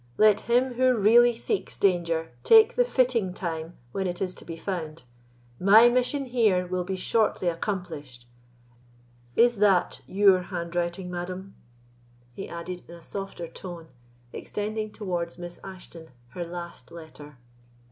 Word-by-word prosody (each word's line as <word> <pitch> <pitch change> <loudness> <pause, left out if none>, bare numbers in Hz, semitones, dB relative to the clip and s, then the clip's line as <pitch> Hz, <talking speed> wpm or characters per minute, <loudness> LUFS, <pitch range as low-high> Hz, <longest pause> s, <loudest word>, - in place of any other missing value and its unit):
—let 215 -1 +5
him 250 +2 +3
who 255 0 +3
really 235 +3 +5
seeks 390 - -3
danger 170 -5 +1
take 450 +1 +7
the - - +4
fitting 240 - +1
time 165 -2 -5
when 190 +5 -2
it 175 -1 -3
is 185 -1 -2
to - - -13
be 165 -1 -8
found; 165 -3 -5 0.6
my 215 +5 +7
mission 255 +3 0
here 220 -8 +2
will 180 0 -2
be 190 +1 -3
shortly 210 0 0
accomplished. 165 - -4 1.1
Is 240 -1 +4
that 195 -3 +2
your 195 -1 +4
handwriting, 175 0 -3
madam?" 185 +2 -6 0.8
he 195 - -7
added 175 +1 -6
in 170 - -9
a 170 - -14
softer 195 -3 -5
tone, 170 -1 -9 0.4
extending 215 +1 -4
towards 175 -6 -4
Miss 175 -1 -8
Ashton 175 -4 -10 0.2
her 175 +6 -5
last 170 -6 -8
letter. 155 -4 -12
185 Hz, 135 wpm, -26 LUFS, 170-215 Hz, 1.1 s, take